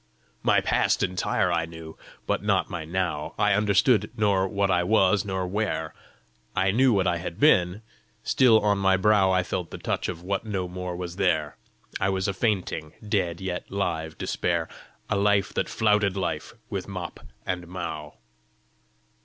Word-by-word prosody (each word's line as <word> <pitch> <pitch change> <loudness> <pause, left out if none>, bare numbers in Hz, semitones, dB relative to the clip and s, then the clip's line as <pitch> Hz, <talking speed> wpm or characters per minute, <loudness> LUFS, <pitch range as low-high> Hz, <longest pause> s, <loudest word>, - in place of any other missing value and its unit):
"My - - +3
past - - +1
entire 90 0 0
I 85 -1 0
knew, 80 -1 -10 0.3
but - - 0
not - - +1
my 85 -3 -4
now; 85 -3 -2
I 105 -1 +3
understood 105 +2 +3
nor 100 -3 +2
what 100 0 0
I 90 -1 +3
was, 95 0 +3
nor 95 -2 -2
where; 105 +4 -2 0.6
I 95 0 +2
knew 130 +5 +4
what 100 -4 +2
I 90 -1 +1
had 85 +2 -6
been: 95 - +3 0.4
still 115 -4 +5
on 100 -1 +2
my 95 -1 +3
brow 95 0 +4
I 95 -1 +2
felt 90 -1 -3
the - - -7
touch - - -2
of 85 -1 -6
what 95 +1 -2
no 100 -5 -3
more 90 0 -5
was 90 0 -6
there! - - +1 0.4
I 95 - +1
was 95 -1 0
a 100 - 0
fainting, 95 -7 -1
dead, 90 -5 0
yet 90 -1 -4
live 80 -5 -2
Despair; 85 -2 -1 0.4
A - - 0
life 100 0 +2
that - - -1
flouted 105 -3 +2
life 85 -2 -3
with 100 -6 -4
mop 90 -3 -6 0.3
and 90 -1 -3
mow! 80 -4 -6
95 Hz, 170 wpm, -26 LUFS, 90-100 Hz, 0.6 s, still